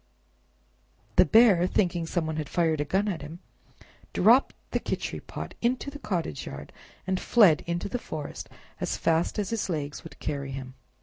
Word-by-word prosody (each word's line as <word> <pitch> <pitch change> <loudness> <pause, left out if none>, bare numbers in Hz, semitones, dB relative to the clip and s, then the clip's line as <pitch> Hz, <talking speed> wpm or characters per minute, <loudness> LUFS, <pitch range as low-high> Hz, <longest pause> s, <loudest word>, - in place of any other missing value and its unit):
The - - +8
Bear, 200 -3 +6
thinking 175 -4 0
some 170 -1 -1
one 160 0 -3
had 150 -2 -3
fired 160 -3 +1
a - - -1
gun 195 +7 +1
at 185 -6 -2
him, 150 +3 -8 0.8
dropped 235 +8 +5 0.2
the - - +1
Khichri - - -3
pot - - -7
into 250 +4 0
the 290 - -9
cottage 175 - -3
yard, - - -8 0.3
and 185 -1 0
fled 195 -11 +5
into 170 0 -2
the 245 +4 -3
forest 155 -8 -6 0.3
as - - -2
fast 165 +1 +1
as 205 -1 -2
his 225 -4 -1
legs 145 -4 -3
would - - -11
carry 140 -2 -3
him. 130 -1 -6
170 Hz, 175 wpm, -27 LUFS, 155-205 Hz, 0.8 s, The